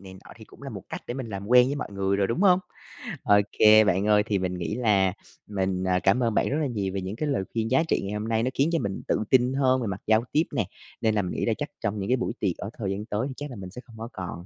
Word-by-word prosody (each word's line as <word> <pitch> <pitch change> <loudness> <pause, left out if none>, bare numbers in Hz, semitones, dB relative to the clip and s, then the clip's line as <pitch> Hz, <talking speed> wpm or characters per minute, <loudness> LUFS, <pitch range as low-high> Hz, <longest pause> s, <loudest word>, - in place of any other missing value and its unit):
này 95 -1 -11
nọ 95 - -14
thì - - -12
cũng - - -18
là - - -6
một - - -7
cách - - -6
để 120 - -4
mình 130 -3 -5
làm 100 -1 -6
quen 125 +1 +6
với 140 - -1
mọi - - -4
người 100 0 0
rồi, 100 -1 +2
đúng 115 - -2
hông? 185 -2 +6 0.7
OK, 105 +1 +5
bạn 95 +3 +2
ơi. 105 -1 +5
Thì 105 -3 0
mình 90 -1 -2
nghĩ 85 +4 -3
là 100 -6 +2 0.3
mình, 95 -2 -1
ờ, 90 -1 +2
cảm 120 +6 +3
ơn 115 -2 +1
bạn - - +1
rất 145 - 0
là 145 - +1
nhiều 100 -6 -3
về 95 - -2
những 95 +3 -5
cái 150 +5 -2
lời 115 -9 0
khuyên 115 +1 -1
giá 135 +5 +4
trị - - +1
ngày 100 +1 -4
hôm 105 +1 -3
nay. 115 0 +1
Nó 130 - +1
khiến 140 +5 +2
cho 165 - +2
mình 100 -6 -3
tự - - +1
tin 125 0 +4
hơn 130 -1 +2
về 115 - -2
mặt 95 -1 -4
giao 110 +1 +4
tiếp 155 - +3
nè. 110 -7 +1 0.4
Nên 110 -2 +2
là 105 - +2
mình 90 - -4
nghĩ - - -2
là - - +2
chắc - - -4
trong 105 +1 -1
những 95 - -3
cái 130 - +3
buổi 125 - -2
tiệc 95 -5 -1
ở 100 - -5
thời 100 -4 -2
gian 100 +2 -4
tới 110 +3 -2
thì 135 - -6
chắc 145 0 -6
là 125 - -8
mình 95 -3 -8
sẽ 125 - -9
không 115 -3 -15
có 115 +1 -6
còn 90 -2 -6
105 Hz, 320 wpm, -26 LUFS, 95-125 Hz, 0.7 s, quen